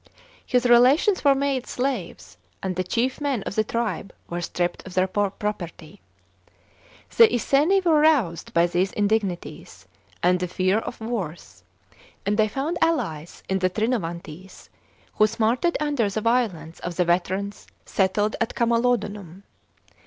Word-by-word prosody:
His 250 0 +1
relations 255 - +5
were 280 -1 +5
made 270 -2 -1
slaves, 250 -9 -4 0.3
and 190 -1 -2
ihe 185 - -1
chief 255 +7 -1
men 275 -8 -1
of - - -5
the 215 - +1
tribe 215 -4 -3 0.2
were 175 0 -4
stript 175 0 -2
of 185 - -10
their 185 0 +3
property. 190 -3 -4 1.1
The 460 - +8
Iconi 300 - +2
v/ore 325 -4 +4
roused 270 - +2
by 170 0 +3
these 175 +2 0
indignities 205 -4 -2 0.4
and 180 +1 +3
the 180 - -2
fear 185 +3 +1
of 240 - -7
worse, 210 -8 -5 0.6
and 205 +1 +1
ihcy 215 -1 +2
Tound 285 +8 -2
allies 220 - -1
in 190 0 0
the 185 0 +2
Trinovantes, 185 -5 -4 0.5
who 215 - +5
smarted 230 +9 0
under 290 -8 0
the 215 +2 -3
violence 210 -9 -1
of 175 -1 -5
the 180 - +1
veterans 190 +4 -1 0.2
settled 205 +2 0
at 230 - -1
Camalodunum. 210 -6 0
210 Hz, 140 wpm, -24 LUFS, 185-250 Hz, 1.1 s, The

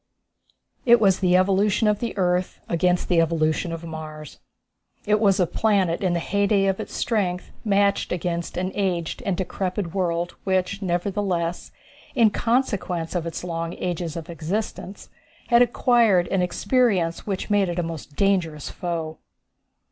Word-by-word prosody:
It 240 -1 +6
was 195 -3 +3
the 180 -1 +4
evolution 195 +3 +2
of 210 -1 +2
the 235 -3 -4
earth 180 -1 0
against 180 +1 +1
the 170 -2 +4
evolution 160 0 0
of 165 0 -6
Mars. 155 -2 -8 0.7
It 210 +1 +3
was 200 -2 +3
a 180 - +4
planet 190 -3 +1
in 185 -3 +1
the 170 - 0
heyday 200 +2 +1
of 195 -1 0
its - - -6
strength 185 -6 -1
matched 200 -2 +2
against 170 -1 -3
an 185 +1 -1
aged 180 -5 -2
and 190 -3 0
decrepit 185 -1 -3
world 175 -2 -1
which, 190 +1 0
nevertheless, 180 -1 -2 0.4
in 230 -4 +5
consequence 200 -9 -1
of 170 -2 -2
its 165 - -5
long 165 -1 -3
ages 175 -3 -3
of 165 0 -6
existence, 185 +4 -5 0.4
had 235 -1 +6
acquired 235 -6 +3
an 195 - +1
experience 180 -3 +1
which 195 +1 -3
made 200 -3 +3
it 175 - -4
a 175 - 0
most 160 -3 -7
dangerous 175 -7 0
foe. 165 -3 -4
180 Hz, 150 wpm, -24 LUFS, 170-200 Hz, 0.7 s, It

